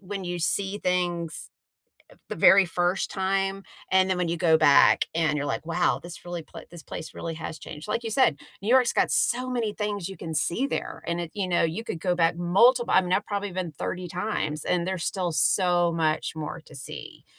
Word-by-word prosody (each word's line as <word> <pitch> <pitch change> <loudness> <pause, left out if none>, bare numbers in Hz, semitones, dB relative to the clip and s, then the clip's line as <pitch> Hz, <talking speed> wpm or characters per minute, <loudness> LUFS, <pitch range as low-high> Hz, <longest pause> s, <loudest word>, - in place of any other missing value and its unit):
when 195 0 -6
you 175 0 -3
see 195 +4 0
things 175 -3 -2 0.8
the - - -4
very 195 0 +7
first 175 +2 -1
time 195 0 -1 0.3
and 190 0 +4
then 185 - +1
when 180 -1 -1
you 170 - -1
go 165 -2 +4
back 145 -3 +5
and 160 -2 +1
you're 145 - -2
like, - - -3
"Wow, 170 +1 +1
this 175 0 -9
really 175 -1 -5
pla - - -12
this 170 -2 -10
place 160 - -8
really 165 -1 -5
has 160 0 -7
changed." 150 +4 -9
Like 230 - -1
you 225 - -3
said, 210 - +3 0.2
New 210 - -4
York's 250 -1 +4
got - - +2
so 255 +1 +2
many 230 -4 -2
things 205 -3 -3
you 195 - -8
can 165 -1 -6
see 175 - +1
there, - - -4
and 170 +1 -2
it 170 -2 -5
you 200 -3 -2
know, 175 - +2
you 165 +8 -3
could 165 - -5
go 180 +1 +1
back 165 -1 +2
multiple 235 +8 +3
I - - +7
mean, 180 0 -3
I've 205 - +1
probably 205 -1 -3
been 175 -3 -4
30 180 +4 -5
times, 170 -5 -3
and 175 -1 0
there's 185 -3 -2
still 180 -3 -1
so 175 0 +3
much 160 -1 -1
more 155 +1 -5
to 150 - -15
see, 130 - -9
180 Hz, 215 wpm, -26 LUFS, 165-195 Hz, 0.8 s, very